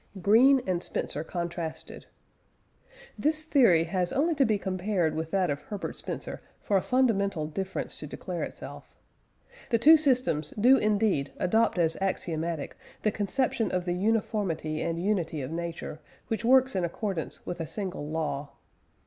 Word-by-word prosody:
GREEN 245 +8 +5
AND 180 -2 0
SPENCER 155 - -3
CONTRASTED. 170 -1 -5 1.1
This 310 +1 +1
theory 245 - +5
has 180 +1 -1
only 320 +5 +2
to 280 -3 +3
be 215 -3 +2
compared 185 -3 -1
with 160 +1 -3
that 185 -4 +1
of 140 - -3
Herbert 205 -2 -5
Spencer - - -5 0.2
for 205 - -1
a 190 - +4
fundamental 200 -10 +1
difference 190 +5 -4
to - - -6
declare - - -5
itself. - - -8 0.7
The 235 - +3
two 310 +8 +8
systems 250 - +1
do 255 +5 +7
indeed 210 - +1
adopt 220 +2 +2
as 165 -2 +1
axiomatic 165 -4 -2 0.3
the 215 - +3
conception 220 +1 0
of 180 -1 -1
the 175 - 0
uniformity 185 -6 -1
and 165 0 -1
unity 180 -4 -1
of 130 - -5
nature, 165 -2 -5 0.3
which 225 0 -2
works 260 0 +4
in 185 - +1
accordance 175 0 -4
with 175 0 -5
a 165 - -3
single 185 -7 -5
law. 150 -3 -3
190 Hz, 150 wpm, -28 LUFS, 165-225 Hz, 1.1 s, two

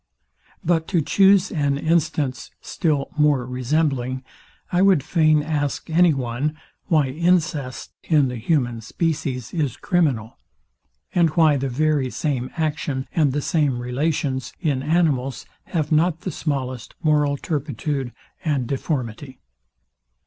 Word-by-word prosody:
But 165 -1 +1
to 175 -4 +1
chuse 195 +3 +4
an 145 -4 0
instance, 155 -4 0
still 150 -6 -1
more 145 -4 +3
resembling; 130 0 -1 0.5
I 180 0 +2
would 190 -8 +4
fain 155 -3 +3
ask 145 0 -2
any 175 +1 +5
one, 135 +3 -2 0.3
why 150 -5 +3
incest 155 -4 0
in 150 -4 +3
the 125 -1 -4
human 120 -2 0
species 130 -2 -2
is 150 -8 -1
criminal, 140 - 0 0.7
and 170 -2 +4
why 155 -3 +5
the 135 0 -2
very 145 0 +1
same 130 -3 -2
action, 150 -4 -2
and 150 -4 +3
the 145 +1 -2
same 145 -6 +1
relations 130 +1 -2
in 145 -6 0
animals 145 -5 0 0.2
have 155 -3 -2
not 160 +1 +2
the 185 - -4
smallest 130 -6 -4
moral 150 -2 +2
turpitude 145 -3 -3 0.3
and 145 -6 0
deformity? 130 -1 -3
145 Hz, 125 wpm, -22 LUFS, 130-160 Hz, 0.7 s, any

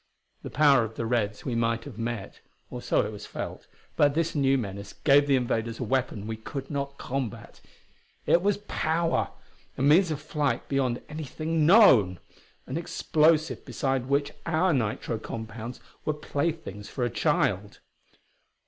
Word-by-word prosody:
The - - -7
power 145 -5 +5
of 110 0 -6
the 115 - -3
Reds 110 -3 -1
we 125 - -2
might 115 0 0
have 120 -5 -10
met 115 -3 -4 0.3
or - - -6
so - - +1
it - - -4
was - - -9
felt - - -6 0.3
but 145 -1 +3
this 165 0 0
new 135 -2 +3
menace 100 -4 -5
gave 145 0 +4
the 140 - +4
invaders 115 -2 -1
a - - -1
weapon 125 -4 -1
we 110 0 -4
could 135 +6 -7
not 140 -1 -3
combat. 130 -4 -5 0.6
It 170 - +4
was 200 +1 +2
power! 160 -9 0 0.5
a - - -1
means 165 +6 +5
of 155 -3 -2
flight 150 -4 -1
beyond 130 -3 0
anything 155 +1 -1
known! 125 - +6 0.5
an 135 - -4
explosive 160 -1 +2
beside 135 -3 -1
which 140 +1 +1 0.2
our 165 +2 +2
nitro 115 -2 -1
compounds 115 +2 -7 0.2
were 155 - -1
playthings 145 - -3
for 125 - -3
a - - 0
child. 120 - 0
135 Hz, 155 wpm, -27 LUFS, 115-155 Hz, 0.6 s, known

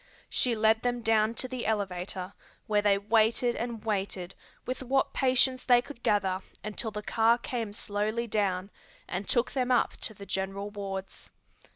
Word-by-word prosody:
She 245 -2 +1
led 220 0 +4
them 245 -1 -1
down 220 0 +3
to 255 - -3
the 255 -1 -4
elevator, 190 -2 -2 0.3
where 210 -1 +2
they 205 -1 +4
waited 225 +3 +2
and 230 -2 -4
waited 195 -3 -2 0.3
with 255 +1 -3
what 265 +1 +1
patience 255 0 +3
they 245 -2 +6
could 255 0 -8
gather 190 -4 +1 0.2
until 215 +2 -3
the 210 0 -6
car 225 +2 +4
came 235 -3 -3
slowly 210 +2 -2
down 200 -3 0 0.4
and 190 +3 -4
took 240 0 +2
them 255 -2 0
up 245 -2 +3
to 220 - -7
the 200 - -9
general 195 +1 -3
wards. 195 -2 -6
220 Hz, 165 wpm, -29 LUFS, 200-240 Hz, 0.4 s, they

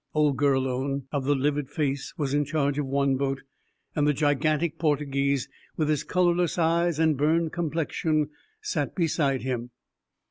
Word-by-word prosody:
Old 150 -2 +3
Gurlone, 135 0 0
of 140 -3 -2
the 145 +1 +3
livid 145 0 0
face, 140 -3 -2
was 140 -4 -1
in 145 0 +3
charge 145 -1 0
of 145 - -1
one 140 0 +1
boat, 135 0 -2 0.5
and 150 -1 +2
the 150 - +3
gigantic 150 +3 +1
Portuguese, 140 -3 +1 0.3
with 155 -2 +1
his 150 -3 +1
colorless 175 -2 +1
eyes 170 0 +2
and 160 -1 +3
burned 160 +3 +1
complexion, 155 -2 -1 0.3
sat 415 -1 -2
beside 150 -7 +1
him. 125 -2 -3
145 Hz, 150 wpm, -26 LUFS, 140-160 Hz, 0.5 s, Old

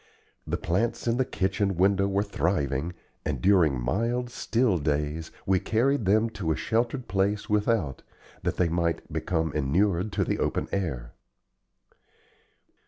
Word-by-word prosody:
The - - -1
plants 115 +7 -1
in 115 +1 +2
the 130 - +2
kitchen 95 -3 0
window 100 +1 +3
were 100 +1 +1
thriving, 80 -5 -1 0.3
and 75 -4 -2
during 85 -7 +4
mild, 115 - -1
still 115 -6 +1
days 75 +2 -1 0.2
we 95 -1 +3
carried 115 +5 +1
them 110 +4 +4
to 85 -7 -2
a - - +1
sheltered 120 +3 -1
place 100 +2 0
without, 105 - +1 0.4
that - - -2
they 90 - +3
might 85 0 -1
become 80 -4 -1
inured 90 +7 +1
to - - +1
the - - -1
open - - -1
air. 70 -12 -3
95 Hz, 140 wpm, -27 LUFS, 80-110 Hz, 0.4 s, during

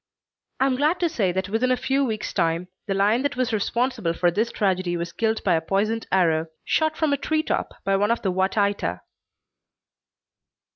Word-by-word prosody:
I 265 - +3
am 260 -2 +1
glad 305 +6 +2
to 345 - +3
say 210 - 0
that 190 +1 -2
within 225 +5 +1
a 255 - +2
few 275 +2 +1
weeks' 220 -5 -3
time 170 0 0 0.2
the 195 - 0
lion 210 +5 +3
that 285 +1 -1
was 255 -2 -1
responsible 225 -3 0
for 175 0 +2
this 220 +6 0
tragedy 185 -4 0
was 170 0 -4
killed 220 -1 -1
by 185 - +3
a 165 - +2
poisoned 210 +6 -1
arrow, 165 -4 +2 0.2
shot 315 0 +1
from 310 -3 +1
a - - +1
tree 310 +2 0
top - - -2
by 195 - +2
one 205 +2 +2
of 235 - 0
the 190 - +1
Wa 190 +1 +2
Taita. 200 - -1
210 Hz, 200 wpm, -24 LUFS, 185-255 Hz, 0.2 s, I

